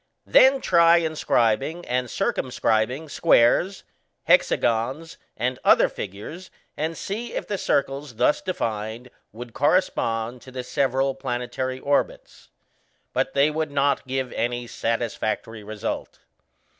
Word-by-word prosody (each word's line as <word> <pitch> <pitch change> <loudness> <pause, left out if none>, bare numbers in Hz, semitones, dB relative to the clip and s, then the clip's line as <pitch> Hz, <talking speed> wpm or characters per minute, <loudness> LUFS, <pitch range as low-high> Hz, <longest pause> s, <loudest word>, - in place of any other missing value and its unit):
Then 265 +1 +5
try 170 -1 +5
inscribing 155 -1 0
and 125 0 -1
circumscribing 125 +5 0
squares, 165 +5 +3 0.4
hexagons, 130 +8 +1 0.2
and 125 +2 -1
other - - +5
figures, 105 - -8 0.3
and 160 +2 -3
see 225 +5 -5
if - - -3
the 205 -2 -3
circles 140 -2 -1
thus 145 - +2
defined 115 - -4 0.2
would 120 +1 -10
correspond 125 -7 0
to 130 - -13
the 130 0 -5
several 135 +1 0
planetary 130 0 -4
orbits. 140 +2 -2 0.6
But - - -1
they 140 +2 +4
would 155 0 -2
not 140 -1 0
give 130 -1 -2
any 120 +1 -2
satisfactory 115 -2 -3
result. 105 0 -5
130 Hz, 115 wpm, -24 LUFS, 115-155 Hz, 0.6 s, Then